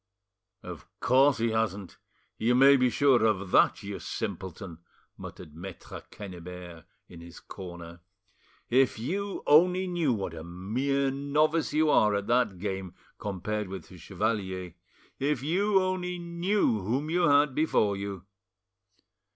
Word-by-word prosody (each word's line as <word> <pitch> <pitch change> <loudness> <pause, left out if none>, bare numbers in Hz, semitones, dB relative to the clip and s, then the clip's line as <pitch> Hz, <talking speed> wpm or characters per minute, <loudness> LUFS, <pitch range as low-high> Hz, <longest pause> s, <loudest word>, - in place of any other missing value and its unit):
"Of - - -9
course 135 +2 +4
he 115 0 0
hasn't, 105 -4 -2 0.4
you 120 +2 +2
may 135 +2 +7
be 125 -2 +3
sure 125 -1 +3
of 100 -4 0
that, - - +4
you - - -6
simpleton!" 90 -2 -6 0.4
muttered 75 - -10
Maitre 90 +1 -9
Quennebert 90 -3 -9 0.2
in 85 -1 -12
his 85 0 -12
corner. 85 -3 -10 0.7
"If 130 0 +3
you 195 - -3
only 180 +5 +5
knew 175 -6 0
what 100 -7 -3
a 80 -1 -8
mere 125 +11 -1
novice 150 +4 +1
you 155 0 +2
are 105 -1 +4
at 100 0 -2
that 120 -5 +1
game 95 -1 -5 0.2
compared 105 +1 -3
with 95 0 -8
the 90 - -13
chevalier! 95 -2 -3 0.5
If 140 -2 0
you 195 +6 +2
only 185 -1 -2
knew 170 - 0
whom 130 +11 -2
you 175 0 +3
had 145 -1 +4
before 120 -9 +1
you!" 100 -2 -6
115 Hz, 135 wpm, -28 LUFS, 95-145 Hz, 0.7 s, may